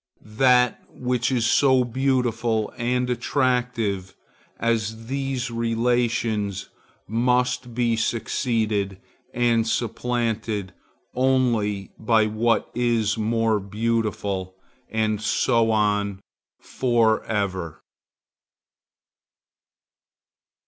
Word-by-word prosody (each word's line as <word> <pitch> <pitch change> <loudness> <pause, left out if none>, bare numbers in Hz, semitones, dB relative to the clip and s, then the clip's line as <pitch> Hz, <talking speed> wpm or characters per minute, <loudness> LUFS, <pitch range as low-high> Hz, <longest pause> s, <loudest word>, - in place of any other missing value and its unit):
That 125 -2 +4
which 125 0 -1
is 120 -3 +1
so 130 +1 +4
beautiful 120 -3 0
and 125 +1 0
attractive 120 -6 -1 0.4
as 115 -1 -1
these 135 -1 -3
relations, 115 -3 0 0.4
must 125 +2 0
be 120 -1 +2
succeeded 110 -3 -1 0.3
and 115 -2 +2
supplanted 115 -4 -2 0.4
only 120 -6 +1
by 110 -1 +3
what 110 +2 0
is 115 -3 +1
more 115 0 +1
beautiful, 100 -2 -2 0.3
and 110 -1 0
so 115 +1 +2
on 105 -2 +1 0.4
for 115 -4 +1
ever. 95 -6 -3
115 Hz, 75 wpm, -24 LUFS, 110-125 Hz, 0.4 s, That